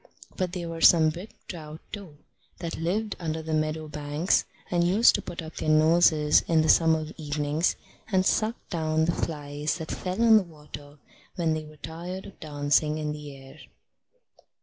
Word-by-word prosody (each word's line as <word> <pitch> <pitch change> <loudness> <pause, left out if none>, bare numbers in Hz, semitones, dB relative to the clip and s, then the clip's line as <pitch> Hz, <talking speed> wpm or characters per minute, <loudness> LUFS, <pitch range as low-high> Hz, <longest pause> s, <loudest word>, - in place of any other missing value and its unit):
But 185 -2 -2
there 175 -2 -4
were 165 0 -6
some 160 -2 +7
big 180 +7 -8 0.2
trout, 155 -3 -8
too, 185 -8 -9 0.4
that 170 -1 -5
lived 205 +6 -1
under 160 -2 -3
the 160 0 -4
meadow 155 0 -1
banks, 150 +3 0 0.3
and 175 -1 +2
used 195 +7 +5
to - - -1
put 170 - -7
up 160 - -10
their - - -2
noses 155 -1 +5
in 160 -2 +3
the 160 - 0
summer 160 -1 +4
evenings, 150 +1 0 0.4
and 190 -1 +2
suck 220 +4 +1 0.2
down 160 -2 +1
the 170 - +2
flies 150 -1 -3
that 160 -2 -6
fell 185 +3 -4
on 225 -1 +7
the - - +4
water 150 -3 -12 0.4
when 165 -3 +1
they 155 0 -4
were 155 0 -14
tired 175 +5 -7
of 195 - -13
dancing 150 0 +1
in 150 -1 -2
the 150 -2 -8
air. 135 +2 -14
160 Hz, 175 wpm, -27 LUFS, 150-175 Hz, 0.4 s, some